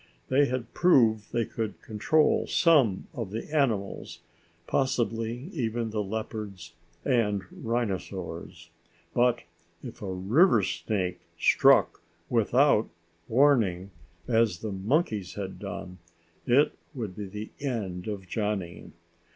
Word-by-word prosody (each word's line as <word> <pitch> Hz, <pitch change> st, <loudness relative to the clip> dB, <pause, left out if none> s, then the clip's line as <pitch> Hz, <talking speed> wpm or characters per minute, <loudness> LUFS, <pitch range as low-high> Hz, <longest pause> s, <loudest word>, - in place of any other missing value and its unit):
They 140 Hz, +2 st, +4 dB
had 120 Hz, -2 st, -4 dB
proved 115 Hz, -12 st, +3 dB
they 115 Hz, -1 st, 0 dB
could 110 Hz, -3 st, -4 dB
control 130 Hz, +8 st, +2 dB
some 135 Hz, -, +3 dB
of 115 Hz, -5 st, -4 dB
the 115 Hz, +9 st, -5 dB
animals, 110 Hz, -9 st, -1 dB, 0.4 s
possibly 120 Hz, -, -1 dB
even 115 Hz, -5 st, -2 dB
the 105 Hz, -1 st, -1 dB
leopards 100 Hz, -4 st, -5 dB, 0.3 s
and 105 Hz, -7 st, +1 dB
rhinosaurs. 95 Hz, -6 st, -4 dB, 0.4 s
But, 120 Hz, -1 st, +2 dB, 0.4 s
if 120 Hz, -1 st, -9 dB
a 100 Hz, -2 st, -4 dB
river 110 Hz, -, +4 dB
snake 90 Hz, +1 st, -2 dB, 0.2 s
struck -, -, +4 dB, 0.3 s
without 120 Hz, +1 st, +3 dB, 0.4 s
warning 110 Hz, -8 st, +3 dB, 0.4 s
as 115 Hz, -6 st, +2 dB
the 110 Hz, -, -3 dB
monkeys 105 Hz, -, -1 dB
had 95 Hz, -2 st, -6 dB
done, 90 Hz, 0 st, -7 dB, 0.5 s
it 135 Hz, +4 st, +4 dB, 0.2 s
would 110 Hz, -8 st, -5 dB
be 105 Hz, 0 st, -5 dB
the 105 Hz, +3 st, -7 dB
end 105 Hz, -10 st, -3 dB
of 100 Hz, -3 st, -5 dB
Johnny. 100 Hz, -4 st, -3 dB
110 Hz, 110 wpm, -28 LUFS, 95-120 Hz, 0.5 s, They